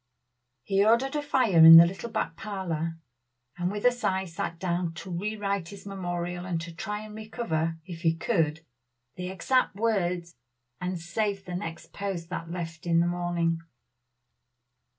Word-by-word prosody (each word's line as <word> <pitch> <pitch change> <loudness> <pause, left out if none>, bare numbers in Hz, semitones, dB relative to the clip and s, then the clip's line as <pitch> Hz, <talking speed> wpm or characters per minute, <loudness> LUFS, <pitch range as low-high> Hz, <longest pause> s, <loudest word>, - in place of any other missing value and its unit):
He 195 +6 +2
ordered 235 +6 +3
a 295 - +1
fire 255 -10 +2
in 165 0 +13
his 170 +1 +9
little 195 +6 -5
back 165 - -2
parlor; 165 -5 -3 0.6
and 175 0 -1
with 205 +2 -4
a 245 - +7
sigh 190 -6 -1
sat 165 -1 -4
down 175 -1 -2
to 180 0 -6
rewrite 200 -1 -2
his 200 +1 -11
memorial 175 -2 -4
and 180 -2 -2
to 170 0 -7
try 210 +5 -4
and 215 - -10
recover, 210 -7 -2
if 170 -3 -8
he 165 -1 +2
could, 165 -3 0 0.5
the 180 0 -5
exact 255 +5 +1
words, 180 -6 0 0.5
and 180 0 -3
save 195 +4 -2
the 180 - -6
next 165 -2 -6
post 190 -4 -4
that 165 -2 -4
left 170 -1 -6
in 165 -1 +4
the 170 - +3
morning. 175 -1 0
180 Hz, 160 wpm, -28 LUFS, 165-200 Hz, 0.6 s, in